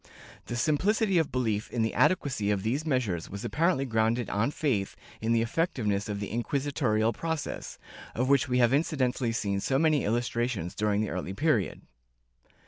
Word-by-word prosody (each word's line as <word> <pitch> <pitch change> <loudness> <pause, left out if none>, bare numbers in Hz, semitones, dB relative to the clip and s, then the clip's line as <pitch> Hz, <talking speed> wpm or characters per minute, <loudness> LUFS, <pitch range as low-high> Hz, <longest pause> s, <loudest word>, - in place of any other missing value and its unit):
The 120 - -3
simplicity 190 - +2
of 160 - 0
belief 110 -4 -1
in 120 -2 -1
the 110 - -1
adequacy 130 - +2
of 100 -2 0
these 135 +9 -1
measures 115 - -1
was 100 +1 -6
apparently 165 -3 +1
grounded 115 0 0
on 105 +6 +1
faith 130 -10 -1 0.3
in 110 +1 0
the 115 -1 +3
effectiveness 115 - -1
of 100 -1 -3
the 100 - -5
inquisitorial 120 -3 0
process, 160 +3 -4 0.4
of 125 +3 0
which 135 -2 +3
we 125 - +2
have 120 0 +4
incidentally 135 -5 +1
seen 100 -3 -1
so 135 +6 0
many 155 -1 +3
illustrations 120 -4 -1
during 105 -1 0
the 110 - -2
early 90 +2 -4
period. 145 - +1
120 Hz, 165 wpm, -28 LUFS, 105-140 Hz, 0.4 s, have